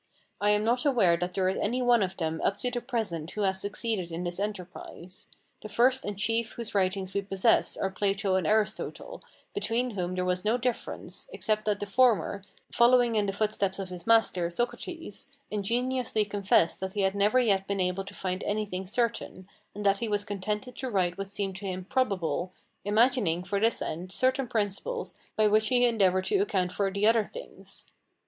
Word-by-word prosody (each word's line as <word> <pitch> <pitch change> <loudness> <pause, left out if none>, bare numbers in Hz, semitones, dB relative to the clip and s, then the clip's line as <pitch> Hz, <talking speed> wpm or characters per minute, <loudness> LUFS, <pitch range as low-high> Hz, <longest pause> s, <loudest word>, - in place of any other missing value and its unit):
I 205 - +3
am 210 0 +3
not 240 +3 +2
aware 230 - +4
that 180 +1 -3
there 190 -1 +2
is 190 - 0
any 235 +5 0
one 240 -2 +5
of 190 -1 -2
them 160 -2 -2
up 200 - +1
to 250 - 0
the 245 -1 -2
present 215 - -3
who 210 - -4
has 190 -1 +1
succeeded 205 -3 -3
in 165 +2 -4
this 175 +1 -4
enterprise. 185 -3 -6 0.3
The 215 - -8
first 255 +5 +3
and 205 -1 -3
chief 225 +2 0
whose 235 -2 -6
writings 190 -1 0
we 200 - +1
possess 195 -1 +2
are 190 - -1
Plato 195 0 0
and 185 -4 +1
Aristotle, 220 - -1 0.3
between 250 - -1
whom 185 -3 -3
there 180 0 -1
was 180 0 0
no 220 +3 +2
difference, 250 - -4
except 215 - -1
that 210 -2 +1
the - - -3
former, 200 -3 +2 0.3
following 240 0 +5
in 210 -2 +1
the - - +1
footsteps 205 -2 -1
of 195 -2 -5
his 180 0 -9
master, 220 -6 +3
Socrates, 240 - -4 0.2
ingenuously 235 +2 0
confessed 200 -4 +2
that 190 0 -4
he 205 - -1
had 190 0 +2
never 205 +4 +3
yet 200 -6 +2
been 200 -1 -1
able 180 +1 0
to 200 - -10
find 185 0 -3
anything 205 -3 -2
certain, 210 -4 -2 0.3
and 205 0 -5
that 195 0 +4
he 235 - -2
was 205 -1 +1
contented 210 +4 -3
to 260 - -3
write 180 -5 +1
what 195 0 -5
seemed 195 -1 -3
to 195 0 -6
him 185 -1 -4
probable, 185 - 0 0.3
imagining, 210 -5 +2
for 200 +2 -1
this 225 +2 +1
end, 180 +3 -5
certain 260 +4 +1
principles 225 - -2 0.2
by 215 - +3
which 215 +1 +4
he 245 +1 +4
endeavoured 190 -5 +2
to 405 - +2
account 190 - 0
for 195 +1 0
the 200 +2 0
other 225 0 +5
things. - - -9
205 Hz, 195 wpm, -28 LUFS, 190-230 Hz, 0.3 s, one